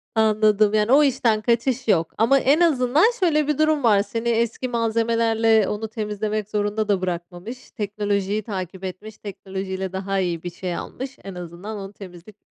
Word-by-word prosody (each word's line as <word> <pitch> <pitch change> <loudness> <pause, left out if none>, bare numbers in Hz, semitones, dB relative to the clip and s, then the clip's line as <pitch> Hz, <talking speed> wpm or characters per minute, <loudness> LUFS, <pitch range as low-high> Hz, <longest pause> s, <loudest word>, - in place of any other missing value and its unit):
Anladım, 215 -1 +3
yani 215 +3 +2
o 295 +2 +7
işten 235 -5 +2
kaçış 240 +2 0
yok, 165 -6 +2
ama 270 +5 +4
en 285 +6 +3
azından 285 -2 +3 0.2
şöyle 305 -5 +2
bir 300 - 0
durum 310 -3 +2
var, 205 -4 +5
seni 230 +3 -3
eski 235 +2 0
malzemelerle 225 -1 +2
onu 215 +1 -3
temizlemek 210 -1 -3
zorunda 210 +1 -1
da 195 -3 +1
bırakmamış, 180 +7 -6
teknolojiyi 205 0 -2
takip 190 -2 -6
etmiş, 195 +4 -7
teknolojiyle 190 -1 -5
daha 195 +1 -2
iyi 175 -3 -2
bir 175 - -3
şey 180 0 -4
almış. 265 +1 -7
En 195 -2 -8
azından 180 +5 -7
onu 195 0 -8
temizleyip 190 +1 -12
215 Hz, 165 wpm, -23 LUFS, 195-235 Hz, 0.2 s, o